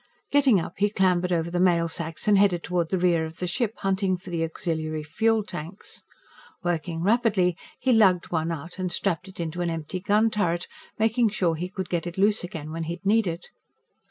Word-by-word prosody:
Getting 275 -8 +5
up, 165 - -5
he 205 +1 +2
clambered 185 -3 +2
over 170 -1 0
the 175 - -1
mail 170 -2 +3
sacks 165 +3 -3
and 210 - +6
headed 195 -4 +3
toward 175 -2 -1
the 190 - +1
rear 175 -2 +2
of 160 0 -7
the 180 - -3
ship, 215 +5 -1
hunting 190 -1 +1
for 180 0 -11
the 165 -1 -1
auxiliary 160 -1 -3
fuel 220 +8 +1
tanks. 175 0 -8 0.6
Working 170 -1 -2
rapidly, 205 -4 +2 0.2
he 260 - +1
lugged 190 -6 +4
one 165 -1 0
out 165 +3 -7
and 185 -1 -2
strapped 180 0 -1
it 190 - -13
into 170 +1 -3
an 175 - 0
empty 165 +2 -4
gun 210 +4 +2
turret, 175 -5 0 0.3
making 225 +1 +3
sure 185 -5 +1
he 175 +3 -4
could 190 -1 -5
get 175 -1 -2
it 175 - -7
loose 205 +1 +3
again 155 -3 -6
when 165 0 -4
he'd 170 +3 -6
need 215 +1 +3
it. 170 +1 -5
180 Hz, 205 wpm, -25 LUFS, 165-200 Hz, 0.6 s, and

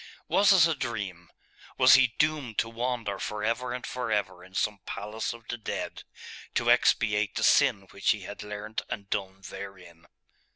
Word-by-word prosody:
Was 200 +1 +5
it 185 -4 +7
a 165 - +2
dream? 100 - -5 0.5
Was 130 0 +7
he 125 -4 +5
doomed 150 -7 0
to 115 - +1
wander 115 -4 -2
for 105 0 -4
ever 120 +3 -1
and 125 0 -4
for 125 -3 -4
ever 95 -4 -1
in 95 +1 -16
some 105 0 0
palace 105 +2 -4
of 115 -1 -11
the 120 - -4
dead, - - -5 0.5
to - - +3
expiate 105 -2 +3
the - - -1
sin 100 - +4
which 100 - -1
he 110 - +3
had 100 +2 -8
learnt 105 +1 -5
and 100 -1 -6
done 95 -1 -3
therein? 90 -4 -10
105 Hz, 175 wpm, -28 LUFS, 100-120 Hz, 0.5 s, it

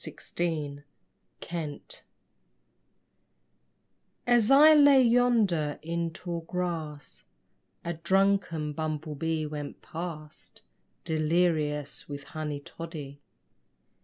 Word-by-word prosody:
BUMBLE 150 -5 -2 0.7
BEE 170 - -6 2.2
As 240 -3 +4
I 295 +3 +8
lay 285 -2 +7
yonder 230 -11 +2
in 170 +1 -2
tall 170 +1 -5
grass 165 -4 -5 0.6
A 170 - -1
drunken 170 -3 +1
bumble 155 0 -3
bee 160 +1 -2
went 150 -1 -7
past 160 -2 -8 0.4
Delirious 155 -3 0
with 140 0 -6
honey 150 -1 -5
toddy. 145 -3 -8
165 Hz, 80 wpm, -28 LUFS, 150-180 Hz, 2.2 s, I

